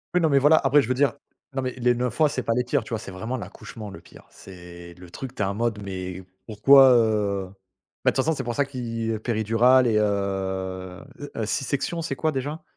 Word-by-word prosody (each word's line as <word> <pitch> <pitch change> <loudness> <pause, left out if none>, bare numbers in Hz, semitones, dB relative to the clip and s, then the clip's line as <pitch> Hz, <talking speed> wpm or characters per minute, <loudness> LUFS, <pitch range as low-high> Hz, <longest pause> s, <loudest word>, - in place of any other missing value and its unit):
Oui. 180 - +4
Non, 160 - +3
mais 140 - +3
voilà 150 +3 +5
après 140 +1 +4
je - - -5
veux 130 - +1
dire, 140 +2 +2 0.4
non 135 - 0
mais 130 - -2
les 125 -1 +1
9 125 +1 -3
mois, 155 -2 +5
c'est 130 -3 -3
pas 115 - 0
les 125 +2 +1
pires, 125 +1 0
tu - - -13
vois? 115 -2 -2
C'est 95 - -9
vraiment 110 +7 -4
l'accouchement, 105 +2 -9
le 100 - -10
pire. - - -17
C'est 85 -2 -12
le 90 0 -14
truc, 130 +8 -8
tu - - -6
es - - +2
en 100 - -2
mode 115 -2 -1
mais 95 -1 -6 0.2
pourquoi, 130 +5 +6
heu 105 -4 +1 0.6
bah - - +5
de - - -15
toute 130 - +3
façon 160 0 +1
c'est 135 - -4
pour 120 - -3
ça 140 +4 +1
qu'il 115 -4 -4
y 110 - -2
péridurale 120 +3 +3
et 110 - +2
heu - - +3 1.3
heu, 110 - -2
sisection, 140 +7 -2
c'est 145 -4 -3
quoi 155 +4 0
déjà? 145 +4 -4
120 Hz, 240 wpm, -24 LUFS, 105-135 Hz, 1.3 s, pourquoi